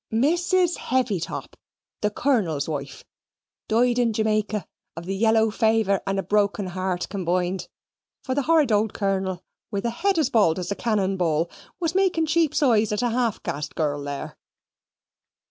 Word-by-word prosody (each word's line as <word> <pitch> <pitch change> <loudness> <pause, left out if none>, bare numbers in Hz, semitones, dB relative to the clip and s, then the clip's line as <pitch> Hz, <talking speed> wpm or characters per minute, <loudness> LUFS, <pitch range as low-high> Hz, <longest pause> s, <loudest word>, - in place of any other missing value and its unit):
"Mrs. 345 +8 +2
Heavytop, 240 -9 -2 0.5
the 210 - +2
Colonel's 200 - 0
wife, 140 -3 -5 0.6
died 240 +2 +2
in 235 -2 +2
Jamaica 215 -3 0 0.3
of 165 +1 -7
the 195 +2 -2
yellow 220 +1 +3
faver 220 -3 +2
and 195 0 0
a 195 - 0
broken 200 +1 +1
heart 185 0 -2
comboined, 180 -1 -1 0.6
for 260 - -2
the 285 - +1
horrud 305 -3 +3
old 210 0 +1
Colonel, 190 -2 -1 0.3
with 200 0 -3
a 235 - +1
head 380 +9 0
as 310 -6 +1
bald 200 -8 +3
as 180 +1 -4
a - - 0
cannon 200 -4 0
ball, 165 -1 0 0.3
was 330 -2 -1
making 370 -4 +2
sheep's 310 -1 +2
eyes 220 -5 +3
at 210 +3 -1
a 240 - +1
half 235 -2 -1
caste 145 +1 -4
girl 145 -2 -1
there. 140 -1 -6
210 Hz, 160 wpm, -24 LUFS, 185-245 Hz, 0.6 s, yellow